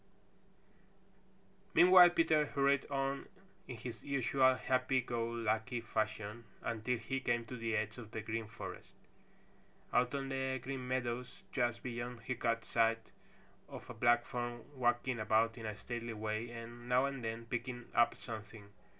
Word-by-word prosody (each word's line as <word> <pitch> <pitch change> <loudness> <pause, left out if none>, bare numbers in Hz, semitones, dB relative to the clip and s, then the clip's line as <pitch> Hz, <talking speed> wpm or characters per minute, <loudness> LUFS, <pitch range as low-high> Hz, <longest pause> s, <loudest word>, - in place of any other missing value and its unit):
Meanwhile 180 0 +9
Peter 160 -3 +3
hurried 140 -1 +2
on 135 0 -1 0.4
in 125 - -6
his 115 0 -7
usual 130 -1 +3
happy 130 0 +1
go 120 -2 -2
lucky 115 +1 -1
fashion 110 0 -3 0.2
until 115 +2 -1
he 115 +4 -3
came 120 -2 0
to 125 - -7
the 115 -2 -1
edge 110 +3 -2
of 115 -3 -9
the 110 - -4
Green 110 +1 -3
Forest. 115 +2 -9 1.0
Out 125 +2 +3
on 135 -1 -2
the 130 0 -1
Green 130 0 -5
Meadows 125 -1 -2
just 120 -3 0
beyond 120 -1 -4
he 130 - -2
caught 115 -2 0
sight 115 0 +1 0.6
of - - -9
a - - -6
black 120 0 +4
form 120 -1 -4
walking 120 -1 +1
about 110 +1 +3
in 115 -2 -6
a 105 - -4
stately 120 0 -4
way 110 +2 -3
and 120 +1 -9
now 125 +2 +4
and 135 -3 -3
then 115 +1 -3
picking 120 +1 -4
up 120 0 +4
something. 110 -2 -8
120 Hz, 150 wpm, -35 LUFS, 115-130 Hz, 1.0 s, Meanwhile